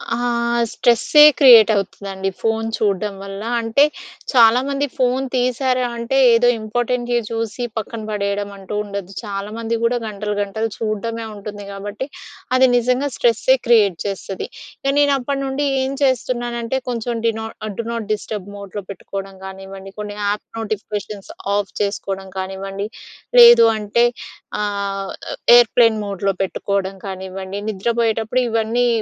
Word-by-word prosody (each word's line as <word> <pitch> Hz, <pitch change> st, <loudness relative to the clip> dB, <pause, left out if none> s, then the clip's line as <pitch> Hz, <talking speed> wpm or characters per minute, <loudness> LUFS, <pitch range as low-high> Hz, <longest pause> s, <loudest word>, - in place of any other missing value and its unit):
ఆహ్, 235 Hz, 0 st, 0 dB
స్ట్రెస్సే 245 Hz, +5 st, +5 dB, 0.2 s
క్రియేట్ 235 Hz, -6 st, +8 dB
అవుతదండి 195 Hz, -1 st, -3 dB
ఫోన్ 225 Hz, 0 st, 0 dB
చూడం 205 Hz, -1 st, 0 dB
వల్ల. 195 Hz, 0 st, -7 dB, 0.2 s
అంటే, 225 Hz, +5 st, +3 dB, 0.5 s
చాలామంది 255 Hz, +4 st, +4 dB
ఫోన్ 255 Hz, +1 st, +1 dB
తీశారా 255 Hz, 0 st, +1 dB
అంటే, 235 Hz, +3 st, -1 dB, 0.2 s
ఏదో 235 Hz, +1 st, +4 dB
ఇంపార్టెంటే 240 Hz, +2 st, -1 dB
చూసి 230 Hz, +2 st, -3 dB
పక్కన 220 Hz, +1 st, -4 dB
పడేయడం 205 Hz, -1 st, -2 dB
అంటూ 195 Hz, +2 st, -7 dB
ఉండదు. 200 Hz, -2 st, -6 dB
చాలామంది 215 Hz, +3 st, -4 dB
గూడా 240 Hz, +1 st, +2 dB
గంటలు, 210 Hz, 0 st, -4 dB
గంటలు 220 Hz, +3 st, -2 dB
చూడ్డమే 225 Hz, +1 st, -3 dB
ఉంటుంది 205 Hz, 0 st, -8 dB
కాబట్టి, 205 Hz, +5 st, -5 dB, 0.5 s
అది 260 Hz, 0 st, +6 dB
నిజంగా 250 Hz, +4 st, +1 dB
స్ట్రెస్సే 240 Hz, +2 st, +3 dB
క్రియేట్ 215 Hz, -7 st, +4 dB
చేస్తది. 195 Hz, -1 st, -4 dB, 0.4 s
ఇక 275 Hz, 0 st, +1 dB
నేను 285 Hz, -1 st, +4 dB
అప్పటినుండి 275 Hz, +1 st, -2 dB, 0.2 s
ఏం 265 Hz, -, -1 dB
చేస్తున్నానంటే, 240 Hz, -1 st, -1 dB
కొంచెం 240 Hz, 0 st, -2 dB
డి 230 Hz, -, +3 dB
నాట్ 220 Hz, 0 st, -7 dB
ఆహ్, 205 Hz, -, -5 dB
డూ 230 Hz, -, -2 dB
నాట్ 230 Hz, -3 st, -4 dB
డిస్టర్బ్ 210 Hz, -2 st, -5 dB
మోడ్‌లో 200 Hz, 0 st, -7 dB
పెట్టుకోవడం 195 Hz, 0 st, -7 dB
గానివ్వండి, 195 Hz, 0 st, -9 dB
కొన్ని 210 Hz, 0 st, -6 dB
యాప్ 205 Hz, +1 st, -2 dB
నోటిఫికేషన్స్ 210 Hz, -2 st, -5 dB, 0.2 s
ఆఫ్ 205 Hz, -2 st, -2 dB
చేసుకోడం 195 Hz, -1 st, -3 dB
కానివ్వండి, 195 Hz, +2 st, -4 dB, 0.5 s
లేదు 475 Hz, -, +9 dB
అంటే 215 Hz, +3 st, +2 dB, 0.6 s
ఆహ్, 200 Hz, -1 st, -3 dB, 0.5 s
ఎయిర్‌ప్లేన్ 230 Hz, -2 st, +4 dB
మోడ్‌లో 195 Hz, 0 st, -1 dB
పెట్టుకోడం 195 Hz, 0 st, -2 dB
కానివ్వండి, 190 Hz, 0 st, -6 dB
నిద్రపోయేటప్పుడు 225 Hz, +3 st, 0 dB
ఇవన్నీ 230 Hz, +2 st, +1 dB
220 Hz, 125 wpm, -20 LUFS, 200-240 Hz, 0.6 s, లేదు